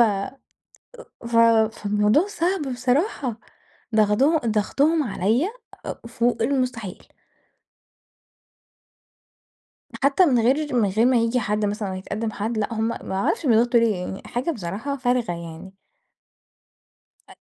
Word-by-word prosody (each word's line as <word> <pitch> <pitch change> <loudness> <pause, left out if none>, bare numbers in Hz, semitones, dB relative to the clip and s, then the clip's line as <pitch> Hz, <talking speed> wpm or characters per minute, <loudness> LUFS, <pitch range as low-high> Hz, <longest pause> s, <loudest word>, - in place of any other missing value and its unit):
أأ 220 +3 +1 0.9
ف 235 0 -1 0.4
فالموضوع 210 - +2
صعب 355 -8 -1
بصراحة 250 - -1 0.5
ضغضه 220 +9 +3
ضغطهم 275 +8 +1
عليَّ 230 - 0 0.4
أأ - - -5
فوق 235 0 0
المستحيل. 250 -6 -2 3.0
حتى 280 +7 +4
من 255 -6 +3
غير 265 +5 +1
من 220 -4 +3
غير 220 +5 +2
ما 255 - +3
ييجي 230 +2 +1
حد 210 -1 -1
مثلًا 205 0 -2
لو - - -4
هيتقدم 210 +4 -4
حد 220 +3 -3
لأ، 215 +2 -2
هُم 220 +1 0
ما 230 - -5
أعرفش 195 - -1
بيضغطوا 235 0 +4
ليه 225 -3 +2
يعني 180 +2 -6
حاجة 250 +7 -2
بصراحة 225 - -4
فارغة 245 -6 0
يعني. 170 +2 -9 1.6
أ - - -13
230 Hz, 120 wpm, -23 LUFS, 210-265 Hz, 3.0 s, حتى